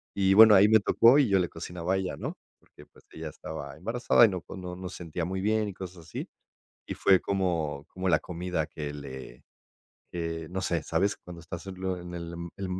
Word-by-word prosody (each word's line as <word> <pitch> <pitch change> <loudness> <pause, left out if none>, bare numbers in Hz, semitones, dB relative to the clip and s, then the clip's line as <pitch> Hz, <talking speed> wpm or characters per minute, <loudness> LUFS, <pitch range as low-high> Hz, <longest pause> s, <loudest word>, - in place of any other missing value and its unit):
Y 95 -1 +3
bueno, 110 0 +10
ahí 100 +2 +7
me 110 +1 +6
tocó 115 +5 +5
y 140 - +4
yo 95 -1 +4
le 90 -2 0
cocinaba 85 +2 -4
a - - +1
ella, 95 -1 -3
¿no? - - -5 0.2
Porque, - - -18
pues, - - -23
ella 80 -1 -6
estaba 70 -2 -8
embarazada 115 +6 +4
y - - +3
no, 90 -3 -4
pues, 95 - -10
no 90 -1 -6
no 90 0 -7
sentía 85 -2 -5
muy 95 +2 -3
bien 110 +1 +1
y - - -7
cosas 90 -2 -9
así, - - -6 0.6
y - - -3
fue 95 -2 +4
como 85 -7 -1
como 95 0 -2
la 80 - +5
comida 90 -2 -3
que 75 -2 -6
le 65 -3 -9 0.7
que, 80 -2 -4
no 95 +1 -3
sé, 85 -4 -1
¿sabes? 95 +7 0
Cuando 85 -1 -11
estás 85 +2 -8
en 95 -1 -7
l 95 -1 -1
en 90 0 -9
el 85 -1 -6
em 85 0 -6
en 95 -1 -4
90 Hz, 225 wpm, -28 LUFS, 80-95 Hz, 0.7 s, bueno